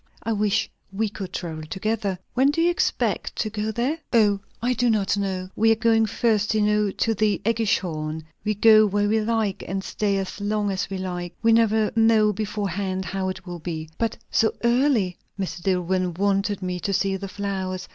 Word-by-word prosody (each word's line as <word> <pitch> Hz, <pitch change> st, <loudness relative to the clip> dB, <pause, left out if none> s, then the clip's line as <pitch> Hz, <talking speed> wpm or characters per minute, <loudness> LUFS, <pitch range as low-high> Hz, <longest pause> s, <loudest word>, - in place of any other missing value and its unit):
"I 225 Hz, -, 0 dB
wish 210 Hz, +1 st, +1 dB, 0.2 s
we 215 Hz, +2 st, -1 dB
could 195 Hz, -2 st, -7 dB
travel 160 Hz, -3 st, -5 dB
together! 200 Hz, +3 st, -2 dB, 0.2 s
When 265 Hz, +3 st, +4 dB
do 295 Hz, -, -1 dB
you 340 Hz, +1 st, +4 dB
expect 345 Hz, -, -1 dB
to 215 Hz, -, -2 dB
get 215 Hz, 0 st, -3 dB
there?" 270 Hz, +7 st, 0 dB
"O, 210 Hz, -4 st, +4 dB, 0.2 s
I 245 Hz, +2 st, +1 dB
do 245 Hz, 0 st, +1 dB
not 210 Hz, -3 st, +2 dB
know. 190 Hz, -2 st, -2 dB
We 225 Hz, +1 st, +4 dB
are -, -, +5 dB
going 225 Hz, 0 st, +3 dB
first, 215 Hz, -1 st, +1 dB
you 215 Hz, -, +3 dB
know, 210 Hz, 0 st, +2 dB
to 225 Hz, +3 st, 0 dB
the 215 Hz, -1 st, +1 dB
AEggischhorn. 170 Hz, -9 st, 0 dB, 0.2 s
We 215 Hz, 0 st, 0 dB
go 215 Hz, +1 st, +6 dB
where 205 Hz, +1 st, +1 dB
we 220 Hz, +1 st, +2 dB
like, 220 Hz, -2 st, -1 dB
and 190 Hz, +2 st, -3 dB
stay 200 Hz, -1 st, -1 dB
as 195 Hz, +1 st, -4 dB
long 205 Hz, 0 st, 0 dB
as 195 Hz, +1 st, -2 dB
we 195 Hz, -, -3 dB
like; 180 Hz, -2 st, -4 dB
and 175 Hz, -, -39 dB
we 230 Hz, 0 st, +5 dB
never 220 Hz, -1 st, +3 dB
know 225 Hz, -2 st, +4 dB
beforehand 195 Hz, -2 st, -2 dB
how 190 Hz, -1 st, -2 dB
it 185 Hz, 0 st, -6 dB
will 175 Hz, -1 st, -6 dB
be." 160 Hz, -1 st, -5 dB
"But 230 Hz, -1 st, -1 dB
so 220 Hz, -, +2 dB
early! 235 Hz, -7 st, +2 dB
" -, -, -27 dB
"Mr. 185 Hz, -2 st, -3 dB
Dillwyn 180 Hz, -1 st, 0 dB
wanted 200 Hz, 0 st, 0 dB
me 180 Hz, -1 st, -2 dB
to 195 Hz, -, -2 dB
see 195 Hz, 0 st, +1 dB
the 195 Hz, +1 st, -5 dB
flowers. 190 Hz, -2 st, -4 dB
205 Hz, 200 wpm, -24 LUFS, 190-220 Hz, 0.2 s, go